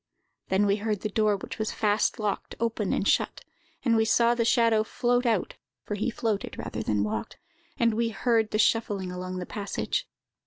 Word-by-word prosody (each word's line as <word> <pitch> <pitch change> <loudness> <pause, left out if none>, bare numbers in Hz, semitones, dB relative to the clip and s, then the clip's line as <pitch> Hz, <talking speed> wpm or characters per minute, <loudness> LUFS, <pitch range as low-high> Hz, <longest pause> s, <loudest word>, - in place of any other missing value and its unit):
Then 190 +2 +2
we 200 0 +2
heard 210 -1 -2
the 215 - -2
door, 215 -1 +2
which 195 - -8
was 220 - -1
fast 210 0 +1
locked, 210 -2 -3
open 225 -3 -1
and 200 - 0
shut; - - +1 0.4
and 230 -2 +4
we 220 - +4
saw 235 +1 +4
the 240 -1 +1
shadow 230 -2 +3
float 245 +2 +1
out 220 -6 +1 0.3
(for - - -5
he 210 +4 -1
floated 220 -3 -2
rather - - -4
than 105 -1 0
walked), 105 0 -3 0.4
and 230 -1 +3
we 230 +1 +1
heard 225 0 +1
the 215 - -1
shuffling 205 -4 +1
along 185 0 -5
the 180 - -4
passage. 210 - -3
215 Hz, 190 wpm, -27 LUFS, 200-230 Hz, 0.4 s, and